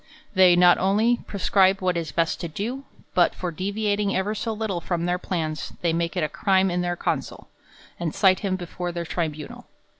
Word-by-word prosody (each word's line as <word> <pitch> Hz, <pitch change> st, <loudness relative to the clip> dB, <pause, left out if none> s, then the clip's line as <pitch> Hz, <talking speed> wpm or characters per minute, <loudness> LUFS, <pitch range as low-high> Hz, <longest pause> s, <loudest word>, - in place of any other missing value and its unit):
They 185 Hz, -2 st, +6 dB
not 175 Hz, 0 st, +6 dB
only 215 Hz, +6 st, +2 dB
prescribe 195 Hz, -1 st, +3 dB
what 185 Hz, -1 st, 0 dB
is 165 Hz, -3 st, -3 dB
best 165 Hz, -1 st, 0 dB
to 170 Hz, -, -3 dB
do; 235 Hz, -, -5 dB, 0.3 s
but -, -, +3 dB
for 180 Hz, -1 st, -4 dB
deviating 205 Hz, +3 st, -1 dB
ever 190 Hz, +3 st, 0 dB
so 225 Hz, +1 st, -3 dB
little 210 Hz, -5 st, -3 dB
from 170 Hz, 0 st, -2 dB
their 180 Hz, +1 st, 0 dB
plans, 160 Hz, -5 st, -3 dB
they 170 Hz, -2 st, +1 dB
make 170 Hz, +2 st, -1 dB
it 175 Hz, -, +1 dB
a -, -, +2 dB
crime 190 Hz, +3 st, +2 dB
in 180 Hz, 0 st, 0 dB
their 175 Hz, 0 st, -1 dB
consul, -, -, -3 dB, 0.5 s
and 170 Hz, -3 st, -3 dB
cite 185 Hz, -2 st, +4 dB
him 195 Hz, -2 st, -1 dB
before 175 Hz, 0 st, -5 dB
their 170 Hz, 0 st, -4 dB
tribunal. 160 Hz, -3 st, -4 dB
180 Hz, 190 wpm, -24 LUFS, 170-195 Hz, 0.5 s, They